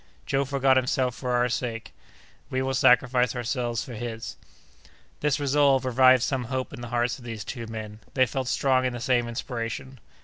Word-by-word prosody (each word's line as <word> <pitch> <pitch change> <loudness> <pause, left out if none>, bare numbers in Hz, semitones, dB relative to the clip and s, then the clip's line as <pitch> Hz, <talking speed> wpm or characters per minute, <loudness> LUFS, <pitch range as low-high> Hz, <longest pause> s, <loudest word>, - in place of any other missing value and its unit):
Joe 135 +1 0
forgot 135 -1 +3
himself 130 -1 +1
for 125 +1 -5
our 120 0 +3
sake; 115 - -4 0.6
we 130 0 -1
will 135 0 -1
sacrifice 125 -1 +3
ourselves 120 -1 -2
for 125 - -8
his!" 115 0 -6 0.8
This 150 -1 +1
resolve 140 -2 +3
revived 130 0 +5
some 130 -3 -1
hope 130 +2 -3
in - - -8
the 120 - -6
hearts 120 +1 0
of - - -14
these 115 -3 -6
two 115 -1 -6
men; 110 -1 -7 0.2
they 130 -1 +5
felt 130 +1 -3
strong 130 0 +2
in 125 -1 0
the 120 - -5
same 120 -1 +1
inspiration. 120 +2 -5
125 Hz, 180 wpm, -26 LUFS, 120-130 Hz, 0.8 s, revived